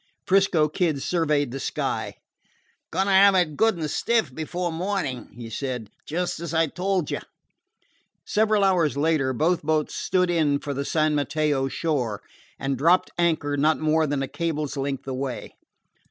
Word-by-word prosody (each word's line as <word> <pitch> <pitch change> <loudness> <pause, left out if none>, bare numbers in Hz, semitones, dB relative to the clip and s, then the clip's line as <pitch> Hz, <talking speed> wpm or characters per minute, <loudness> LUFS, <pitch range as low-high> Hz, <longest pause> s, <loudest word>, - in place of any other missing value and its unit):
'Frisco 190 -5 +3
Kid 155 -1 0
surveyed 150 -4 0
the 135 - -5
sky. - - -3 0.7
"Going 190 - 0
to 200 - 0
have 195 +1 +6
it 170 -5 +2
good 220 +2 +2
and 160 -2 -2
stiff 220 - 0
before 175 +4 -3
morning," 165 -7 -3
he 120 -1 -8
said, 125 -2 -4 0.2
"just 175 +1 -2
as 170 -1 -4
I 165 0 +4
told 180 +1 -1
you." - - -1 1.1
Several 215 -1 +2
hours 170 -8 +2
later, 145 -3 +2
both 160 +7 +1
boats 155 0 0
stood 180 -1 +1
in 155 -4 +2
for 145 0 -5
the 140 +1 -3
San 155 0 +1
Mateo 145 -2 0
shore, 130 - -2 0.3
and 135 -2 -2
dropped 170 +5 +3
anchor 155 -4 +1
not 155 +2 +3
more 155 0 +2
than 140 -1 -1
a - - -3
cable's 150 0 -3
length 135 -1 -3
away. 130 -1 -4
155 Hz, 160 wpm, -24 LUFS, 140-175 Hz, 1.1 s, have